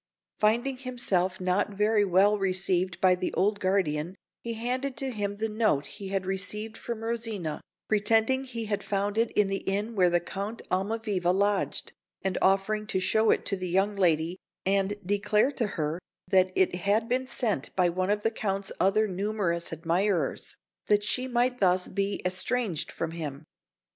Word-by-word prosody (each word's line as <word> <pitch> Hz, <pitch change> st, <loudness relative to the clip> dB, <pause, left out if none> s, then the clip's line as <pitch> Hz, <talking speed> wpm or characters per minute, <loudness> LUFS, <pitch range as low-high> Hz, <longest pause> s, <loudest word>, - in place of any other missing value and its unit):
Finding 240 Hz, +5 st, +2 dB
himself 205 Hz, -8 st, -1 dB
not 185 Hz, +3 st, +1 dB
very 210 Hz, +1 st, +3 dB
well 200 Hz, +2 st, +4 dB
received 185 Hz, -1 st, 0 dB
by 185 Hz, -1 st, +6 dB
the 180 Hz, 0 st, -2 dB
old 205 Hz, +3 st, +2 dB
guardian, 185 Hz, -3 st, 0 dB, 0.3 s
he 230 Hz, -1 st, -4 dB
handed 250 Hz, +3 st, -2 dB
to 265 Hz, +1 st, -1 dB
him 205 Hz, -3 st, -2 dB
the 220 Hz, +1 st, -1 dB
note 210 Hz, -10 st, +1 dB
he 200 Hz, -2 st, -8 dB
had 190 Hz, -1 st, -2 dB
received 210 Hz, +3 st, -3 dB
from 230 Hz, -1 st, -5 dB
Rosina, 225 Hz, -8 st, -2 dB, 0.3 s
pretending 225 Hz, +5 st, +2 dB
he 230 Hz, -3 st, -4 dB
had 205 Hz, -1 st, -1 dB
found 200 Hz, 0 st, -1 dB
it 225 Hz, +1 st, +2 dB
in 210 Hz, -1 st, +3 dB
the 195 Hz, 0 st, -1 dB
inn 205 Hz, +4 st, -2 dB
where 175 Hz, -3 st, +4 dB
Count 200 Hz, +6 st, -5 dB
Almaviva 195 Hz, -1 st, 0 dB
lodged, 200 Hz, +1 st, 0 dB, 0.3 s
and 190 Hz, -1 st, 0 dB
offering 205 Hz, +2 st, +2 dB
to 190 Hz, -, 0 dB
show 220 Hz, +4 st, +2 dB
it -, -, +2 dB
to 200 Hz, -, +1 dB
the 185 Hz, -1 st, -4 dB
young 195 Hz, +3 st, +2 dB
lady 170 Hz, -1 st, +1 dB, 0.3 s
and 195 Hz, +1 st, +1 dB
declare 210 Hz, +5 st, +2 dB
to 240 Hz, -6 st, -1 dB
her 155 Hz, +2 st, -1 dB, 0.3 s
that 185 Hz, 0 st, +4 dB
it 190 Hz, -, +3 dB
had 205 Hz, +5 st, +1 dB
been 255 Hz, +1 st, 0 dB
sent 210 Hz, -, -1 dB
by 180 Hz, -2 st, +4 dB
one 185 Hz, +2 st, -1 dB
of 205 Hz, 0 st, +1 dB
the 225 Hz, -, +1 dB
Count's 195 Hz, -3 st, -2 dB
other 215 Hz, +3 st, +3 dB
numerous 190 Hz, -3 st, -1 dB
admirers, 165 Hz, 0 st, -1 dB, 0.3 s
that 205 Hz, 0 st, +3 dB
she 250 Hz, +4 st, -1 dB
might 250 Hz, 0 st, +1 dB
thus 185 Hz, -1 st, +3 dB
become 200 Hz, 0 st, -2 dB
estranged 185 Hz, 0 st, -1 dB
from 165 Hz, -1 st, -3 dB
him. 155 Hz, -3 st, -6 dB
200 Hz, 170 wpm, -28 LUFS, 185-220 Hz, 0.3 s, by